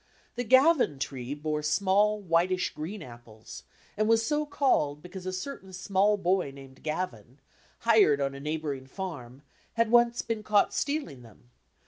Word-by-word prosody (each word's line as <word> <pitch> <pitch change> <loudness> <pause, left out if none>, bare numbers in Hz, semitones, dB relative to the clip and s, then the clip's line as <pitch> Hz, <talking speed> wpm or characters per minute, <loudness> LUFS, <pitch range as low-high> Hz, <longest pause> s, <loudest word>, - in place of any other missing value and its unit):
The 245 - -2
"Gavin" 260 - +4
tree 135 0 -4
bore 150 0 -2
small, 200 +7 +2
whitish 180 0 +1
green 165 +5 -6
apples, 120 -3 -12 0.3
and 215 +1 0
was 225 0 +3
so 300 +2 0
called 150 - +1
because 180 +1 -8
a - - -1
certain 190 0 -6
small 195 +3 +1
boy 185 -4 +1
named 135 -1 -14
Gavin, 135 - -4 0.4
hired 215 -11 +4
on 135 -1 -1
a 135 - -8
neighbouring 150 -3 -4
farm, 140 -7 -7 0.3
had 230 -1 +1
once 235 0 +4
been 225 -2 -3
caught 210 -1 +2
stealing 280 - -2
them. 120 +1 -18
180 Hz, 150 wpm, -28 LUFS, 140-215 Hz, 0.4 s, Gavin